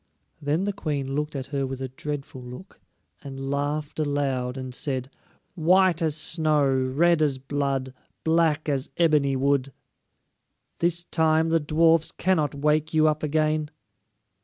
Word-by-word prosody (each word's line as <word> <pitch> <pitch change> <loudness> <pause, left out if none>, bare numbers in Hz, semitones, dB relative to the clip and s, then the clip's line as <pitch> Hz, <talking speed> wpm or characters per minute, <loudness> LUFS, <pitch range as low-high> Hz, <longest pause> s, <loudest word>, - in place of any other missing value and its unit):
Then 150 +5 0
the 205 0 -1
Queen 145 -8 -3
looked 150 +1 -2
at 135 -2 -3
her 135 -1 0
with 130 0 -5
a 130 -1 -4
dreadful 140 0 -6
look, 125 +10 -11 0.4
and 135 -1 -6
laughed 145 +2 -2
aloud 135 -4 -1
and 130 -1 -6
said: 130 0 -3 0.4
"White 180 0 +3
as 155 -3 +1
snow, 155 -2 +2
red 135 +6 +2
as 145 -3 +2
blood, 135 -1 -2 0.3
black 160 -2 +2
as 140 -2 -1
ebony 150 -5 +3
wood! 140 0 +1 1.1
This 170 0 +1
time 160 -1 +2
the 165 0 +3
dwarfs 160 +1 +3
cannot 160 -6 0
wake 150 +2 +1
you 155 0 +5
up 155 0 0
again." 155 0 0
150 Hz, 140 wpm, -25 LUFS, 135-160 Hz, 1.1 s, you